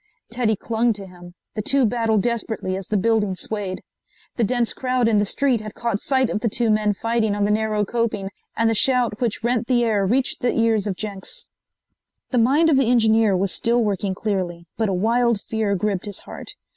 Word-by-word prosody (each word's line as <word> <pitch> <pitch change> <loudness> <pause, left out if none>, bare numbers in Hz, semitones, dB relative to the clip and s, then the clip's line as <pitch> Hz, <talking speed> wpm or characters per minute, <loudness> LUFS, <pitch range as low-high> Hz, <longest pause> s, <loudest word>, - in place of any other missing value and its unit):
Teddy 230 -2 +1
clung 230 +3 0
to 200 -2 -8
him. 175 -1 -14 0.2
The 215 - -3
two 275 +3 +3
battled 225 -2 +1
desperately 225 -5 -2
as 190 -1 -6
the 215 - 0
building 210 -1 +1
swayed. 195 -1 -3 0.5
The 235 - 0
dense 240 +1 +1
crowd 255 -2 0
in 215 -2 +3
the 205 - +2
street 255 +2 +1
had 215 -1 -8
caught 235 -4 -2
sight 260 -3 +1
of - - -1
the 230 - 0
two 230 +1 +1
men 210 -1 +1
fighting 230 -1 0
on 205 0 +1
the 210 - +1
narrow 215 -1 0
coping, 215 -3 -2 0.3
and 230 +1 +2
the 225 - +2
shout 240 -1 +2
which 230 -2 -1
rent 235 -1 0
the 245 -2 +2
air 215 -4 +1
reached 250 +7 0
the 245 - 0
ears 225 -3 +2
of 195 - -2
Jenks. 200 -3 -4 0.9
The 250 - +2
mind 280 +8 +4
of 275 - +4
the 265 -4 +2
engineer 220 -4 +3
was 190 0 0
still 235 +1 +1
working 200 -2 -1
clearly, 185 -5 -3
but 220 -2 0
a - - 0
wild 230 +3 +2
fear 215 -1 -1
gripped 195 -1 -2
his 205 - -5
heart. - - -9
220 Hz, 210 wpm, -22 LUFS, 205-235 Hz, 0.9 s, mind